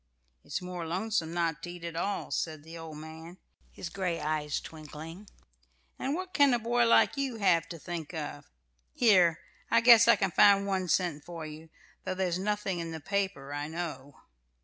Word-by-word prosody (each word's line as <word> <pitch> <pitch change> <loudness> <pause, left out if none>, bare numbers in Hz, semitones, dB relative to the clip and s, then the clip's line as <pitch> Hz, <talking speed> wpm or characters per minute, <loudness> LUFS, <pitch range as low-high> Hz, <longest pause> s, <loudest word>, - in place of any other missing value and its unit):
"It's - - -4
more 180 -1 -5
lonesome 185 -1 -1
not 170 -2 -1
to 175 - -6
eat 175 -1 -9
at 170 -1 -5
all," 200 +4 -2
said 155 -3 -2
the 165 +1 -11
old 165 -2 -8
man, 160 +3 -10 0.3
his 170 - -7
gray 180 -2 -2
eyes 150 -1 -1
twinkling. 160 +5 -10 0.7
"And 275 +3 -1
what 370 +1 -5
can 285 -4 +5
a - - +2
boy 235 +1 +2
like 230 - +4
you 270 -3 -1
have 185 -6 +2
to 170 - -6
think 165 -1 -6
of? 150 -3 -6 0.5
Here, 185 -8 +4 0.3
I 230 - +5
guess 235 -1 +8
I - - +8
can 195 -2 0
find 200 +3 +6
one 190 -2 -1
cent 170 -4 0
for 170 -2 -7
you, 155 +1 -10 0.3
though 185 - -3
there's 185 -2 0
nothing 200 -2 -1
in 165 0 -4
the 160 -1 -5
paper, 185 -6 -2
I 145 +1 -3
know." 155 -4 -6
175 Hz, 185 wpm, -30 LUFS, 160-200 Hz, 0.7 s, guess